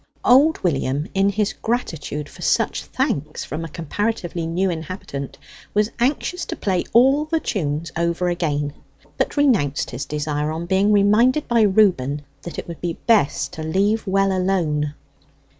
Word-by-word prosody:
Old 285 Hz, +6 st, +5 dB
William, 145 Hz, -3 st, 0 dB
in 195 Hz, +1 st, +3 dB
his 205 Hz, +1 st, 0 dB
gratitude 160 Hz, -, -3 dB
for -, -, -14 dB
such -, -, +1 dB
thanks 150 Hz, +2 st, -2 dB
from 155 Hz, +3 st, -5 dB
a 165 Hz, -, -6 dB
comparatively 175 Hz, +1 st, -3 dB
new 180 Hz, +4 st, 0 dB
inhabitant, 160 Hz, -4 st, -6 dB, 0.4 s
was 210 Hz, +1 st, +2 dB
anxious 290 Hz, +8 st, 0 dB
to -, -, -4 dB
play 185 Hz, -3 st, 0 dB
all 270 Hz, +5 st, +5 dB
the 325 Hz, +1 st, 0 dB
tunes 160 Hz, -, -2 dB
over 170 Hz, +2 st, 0 dB
again; 150 Hz, -5 st, -1 dB, 0.5 s
but -, -, -1 dB
renounced 215 Hz, -, +2 dB
his 125 Hz, +3 st, -4 dB
desire 150 Hz, 0 st, -2 dB
on 165 Hz, +2 st, -4 dB
being 190 Hz, +3 st, +2 dB
reminded 215 Hz, +8 st, +4 dB
by 235 Hz, -1 st, +3 dB
Reuben 185 Hz, -9 st, +3 dB, 0.2 s
that 170 Hz, -, -8 dB
it -, -, -5 dB
would 170 Hz, -2 st, -8 dB
be 170 Hz, -2 st, -3 dB
best 220 Hz, -11 st, +2 dB
to 160 Hz, -, -6 dB
leave 200 Hz, +8 st, 0 dB
well 195 Hz, 0 st, +2 dB
alone. 160 Hz, -6 st, 0 dB
180 Hz, 155 wpm, -21 LUFS, 150-210 Hz, 0.5 s, Old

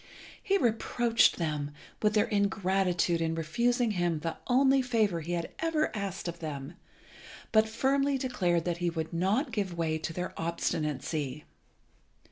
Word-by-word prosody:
He 395 Hz, 0 st, +2 dB
reproached 235 Hz, -, +2 dB
them 150 Hz, -3 st, -2 dB, 0.3 s
with 210 Hz, 0 st, +2 dB
their 210 Hz, -, +4 dB
ingratitude 190 Hz, -4 st, +1 dB
in 165 Hz, 0 st, 0 dB
refusing 235 Hz, +9 st, +1 dB
him 175 Hz, -5 st, 0 dB
the 165 Hz, 0 st, -3 dB
only 265 Hz, +1 st, +4 dB
favour 220 Hz, -9 st, +1 dB
he 170 Hz, +3 st, -4 dB
had 170 Hz, -1 st, -2 dB
ever 320 Hz, -5 st, 0 dB
asked 195 Hz, -3 st, -4 dB
of 170 Hz, 0 st, -5 dB
them, 145 Hz, -1 st, -5 dB, 0.8 s
but 220 Hz, 0 st, +4 dB
firmly 275 Hz, +4 st, +1 dB
declared 180 Hz, -11 st, 0 dB
that 175 Hz, -1 st, -1 dB
he 175 Hz, 0 st, 0 dB
would 160 Hz, 0 st, -4 dB
not 195 Hz, -, +1 dB
give 190 Hz, -5 st, -2 dB
way 160 Hz, -1 st, 0 dB
to 160 Hz, -, -4 dB
their 180 Hz, +2 st, -4 dB
obstinacy. 150 Hz, -3 st, -2 dB
180 Hz, 145 wpm, -30 LUFS, 165-230 Hz, 0.8 s, their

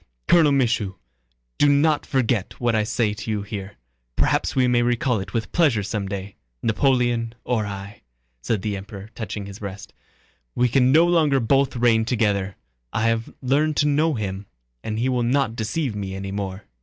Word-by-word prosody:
"Colonel 160 Hz, -4 st, +5 dB
Michaud, 115 Hz, -8 st, +1 dB, 0.6 s
do 145 Hz, -, +5 dB
not 145 Hz, +1 st, +2 dB
forget 120 Hz, -6 st, 0 dB
what 120 Hz, -1 st, +1 dB
I 110 Hz, -1 st, +2 dB
say 110 Hz, -1 st, 0 dB
to 105 Hz, +1 st, -7 dB
you 105 Hz, -2 st, -1 dB
here, 100 Hz, -1 st, -7 dB, 0.4 s
perhaps -, -, +1 dB
we 130 Hz, -1 st, +3 dB
may 120 Hz, -1 st, +3 dB
recall 120 Hz, -1 st, +1 dB
it 95 Hz, -1 st, -7 dB
with 110 Hz, +2 st, -3 dB
pleasure 145 Hz, -, +2 dB
someday... 100 Hz, -1 st, -4 dB, 0.3 s
Napoleon 120 Hz, -1 st, +1 dB
or 110 Hz, -4 st, -1 dB
I," 100 Hz, 0 st, -8 dB, 0.4 s
said 105 Hz, -, -1 dB
the 105 Hz, -2 st, -1 dB
Emperor, 100 Hz, +2 st, -9 dB
touching 105 Hz, -2 st, -5 dB
his 100 Hz, +1 st, -9 dB
breast. 100 Hz, -1 st, -8 dB, 0.6 s
"We 125 Hz, 0 st, +2 dB
can 130 Hz, +1 st, +3 dB
no 160 Hz, +4 st, +6 dB
longer 160 Hz, -6 st, +3 dB
both 135 Hz, +3 st, +2 dB
reign 115 Hz, -2 st, +3 dB
together. 100 Hz, -5 st, 0 dB, 0.4 s
I 110 Hz, +1 st, +1 dB
have 115 Hz, 0 st, -2 dB
learned 145 Hz, +4 st, +1 dB
to 150 Hz, -, +3 dB
know 150 Hz, +1 st, +2 dB
him, 100 Hz, -2 st, -4 dB, 0.4 s
and 110 Hz, 0 st, -3 dB
he 120 Hz, +3 st, 0 dB
will 125 Hz, -2 st, +1 dB
not 120 Hz, -1 st, +1 dB
deceive 115 Hz, +2 st, -2 dB
me 95 Hz, -2 st, -4 dB
any 95 Hz, 0 st, -5 dB
more...." 100 Hz, 0 st, -4 dB
115 Hz, 175 wpm, -23 LUFS, 100-130 Hz, 0.6 s, no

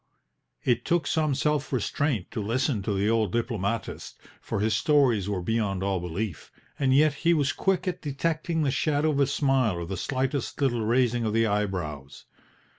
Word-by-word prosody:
It 120 Hz, -1 st, +1 dB
took 170 Hz, -1 st, +1 dB
some 155 Hz, -4 st, +1 dB
self 150 Hz, 0 st, 0 dB
restraint 130 Hz, -, -1 dB
to 110 Hz, -, -3 dB
listen 115 Hz, +2 st, 0 dB
to 100 Hz, +2 st, -2 dB
the 100 Hz, +2 st, +1 dB
old 110 Hz, -4 st, +2 dB
diplomatist, 115 Hz, -2 st, -3 dB, 0.2 s
for -, -, -3 dB
his 110 Hz, +1 st, +1 dB
stories 115 Hz, -, +3 dB
were 95 Hz, -3 st, -2 dB
beyond 100 Hz, -3 st, -1 dB
all 95 Hz, -1 st, 0 dB
belief, 90 Hz, +1 st, -5 dB, 0.3 s
and 135 Hz, -2 st, +2 dB
yet 145 Hz, +2 st, +5 dB
he 170 Hz, 0 st, +4 dB
was 145 Hz, -3 st, +1 dB
quick 190 Hz, -1 st, 0 dB
at 180 Hz, -1 st, -2 dB
detecting 160 Hz, +3 st, -1 dB
the 140 Hz, -, +1 dB
shadow 150 Hz, +2 st, +1 dB
of 140 Hz, -, -1 dB
a 140 Hz, -, +4 dB
smile 135 Hz, -7 st, +1 dB
or 85 Hz, 0 st, -4 dB
the 95 Hz, +3 st, -4 dB
slightest 135 Hz, +6 st, -2 dB
little 125 Hz, -5 st, +1 dB
raising 120 Hz, +1 st, +2 dB
of 110 Hz, -2 st, -1 dB
the 115 Hz, 0 st, +3 dB
eyebrows. 90 Hz, -10 st, -3 dB
120 Hz, 180 wpm, -26 LUFS, 100-145 Hz, 0.3 s, yet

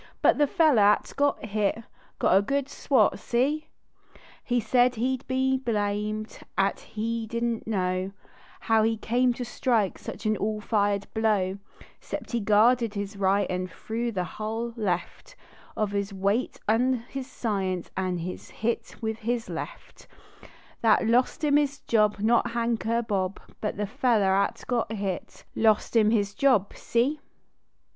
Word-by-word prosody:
But -, -, +5 dB
the 295 Hz, -, +4 dB
feller 310 Hz, -, +4 dB
at 205 Hz, +1 st, +3 dB
got 285 Hz, -4 st, +1 dB
hit 215 Hz, +1 st, -1 dB, 0.4 s
(iot -, -, +4 dB
a 195 Hz, -, +6 dB
good 275 Hz, +6 st, -1 dB
swat. 255 Hz, -7 st, +2 dB
See? 285 Hz, +6 st, 0 dB, 0.8 s
He 245 Hz, -1 st, +1 dB
said 245 Hz, +3 st, +3 dB
he 255 Hz, +4 st, 0 dB
d 255 Hz, -, -20 dB
be 265 Hz, 0 st, +2 dB
blamed, 215 Hz, -2 st, -2 dB, 0.2 s
at 195 Hz, 0 st, +1 dB
he 225 Hz, +1 st, -4 dB
didn 235 Hz, 0 st, -1 dB
t -, -, -9 dB
know 185 Hz, -2 st, -1 dB, 0.5 s
How 225 Hz, -1 st, +3 dB
he 225 Hz, +1 st, +1 dB
came 245 Hz, +3 st, +2 dB
to 245 Hz, +1 st, -5 dB
strike 230 Hz, -5 st, 0 dB
such -, -, -8 dB
an 215 Hz, 0 st, +2 dB
all 215 Hz, +1 st, -1 dB
fired 205 Hz, -2 st, 0 dB
blow, 205 Hz, -4 st, +1 dB, 0.4 s
Cept -, -, -6 dB
he 235 Hz, -, 0 dB
guarded 225 Hz, +2 st, +3 dB
his 200 Hz, 0 st, -4 dB
right 195 Hz, 0 st, +2 dB
an 185 Hz, 0 st, -2 dB
threw 230 Hz, +5 st, -4 dB
the 185 Hz, -4 st, -1 dB
hull 220 Hz, +6 st, -4 dB
heft 215 Hz, -, -3 dB, 0.4 s
Of 210 Hz, -2 st, 0 dB
his 200 Hz, 0 st, -2 dB
weight 200 Hz, +5 st, -1 dB
an 240 Hz, +2 st, +2 dB
his 270 Hz, -2 st, -6 dB
science, 190 Hz, -6 st, -2 dB
an 185 Hz, -1 st, -1 dB
hit 185 Hz, +6 st, -4 dB
with 220 Hz, 0 st, -2 dB
his 235 Hz, 0 st, -2 dB
left; -, -, -8 dB, 0.7 s
That 225 Hz, 0 st, +4 dB
lost 245 Hz, +7 st, +2 dB
iin 295 Hz, -1 st, +4 dB
his 285 Hz, -1 st, -1 dB
job; 210 Hz, -2 st, +2 dB
not 225 Hz, +3 st, +2 dB
Hank 235 Hz, -1 st, -1 dB
er 230 Hz, +1 st, +1 dB
Hob, 195 Hz, -2 st, -1 dB, 0.2 s
But 210 Hz, -, -2 dB
the 210 Hz, -, -1 dB
feller 210 Hz, -2 st, +2 dB
at 200 Hz, +1 st, 0 dB
got 235 Hz, -3 st, 0 dB
hit 195 Hz, -4 st, -4 dB
I.ost 220 Hz, +1 st, +2 dB
him 215 Hz, -2 st, +5 dB
his 205 Hz, -3 st, +1 dB
job. 255 Hz, -8 st, +2 dB
See 260 Hz, +6 st, 0 dB
220 Hz, 155 wpm, -27 LUFS, 200-240 Hz, 0.8 s, a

